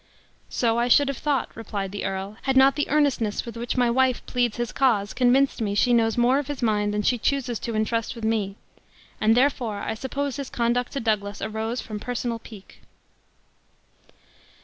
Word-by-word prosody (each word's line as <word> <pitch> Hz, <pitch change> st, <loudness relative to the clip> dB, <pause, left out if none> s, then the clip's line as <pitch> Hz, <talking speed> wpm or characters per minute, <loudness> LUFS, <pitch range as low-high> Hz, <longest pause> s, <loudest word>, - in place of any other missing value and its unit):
"So 230 Hz, -1 st, +1 dB
I 240 Hz, -, +1 dB
should 280 Hz, +3 st, +5 dB
have 275 Hz, -, -4 dB
thought," 290 Hz, -3 st, -1 dB
replied 205 Hz, -3 st, -4 dB
the 205 Hz, -, -4 dB
earl, 195 Hz, +2 st, -4 dB
"had 265 Hz, -1 st, +1 dB
not 270 Hz, +1 st, +6 dB
the 290 Hz, -, -1 dB
earnestness 280 Hz, -8 st, +1 dB
with 235 Hz, -1 st, -8 dB
which 235 Hz, +2 st, -3 dB
my 245 Hz, -1 st, +3 dB
wife 255 Hz, 0 st, +1 dB
pleads 245 Hz, -3 st, 0 dB
his 240 Hz, -1 st, -2 dB
cause 220 Hz, -7 st, +1 dB
convinced 260 Hz, +1 st, +3 dB
me 205 Hz, -2 st, -1 dB
she 245 Hz, +3 st, +3 dB
knows 225 Hz, -1 st, +2 dB
more 245 Hz, +3 st, +4 dB
of 290 Hz, -, -4 dB
his 290 Hz, -4 st, -5 dB
mind 210 Hz, -2 st, +1 dB
than 210 Hz, 0 st, -1 dB
she 245 Hz, +2 st, +2 dB
chooses 255 Hz, -2 st, -1 dB
to 230 Hz, -, -4 dB
intrust 225 Hz, +2 st, -1 dB
me 220 Hz, -2 st, +1 dB
with, 195 Hz, +1 st, -18 dB, 0.4 s
and 220 Hz, +2 st, +4 dB
therefore 245 Hz, -6 st, +1 dB
I -, -, -2 dB
suppose 275 Hz, +4 st, -3 dB
his 280 Hz, -3 st, -5 dB
conduct 240 Hz, +1 st, 0 dB
to 275 Hz, -, -2 dB
Douglas 205 Hz, -3 st, -1 dB
arose 220 Hz, +2 st, -3 dB
from 215 Hz, -2 st, -6 dB
personal 240 Hz, 0 st, -3 dB
pique." 215 Hz, -3 st, -14 dB
235 Hz, 190 wpm, -24 LUFS, 215-260 Hz, 0.4 s, not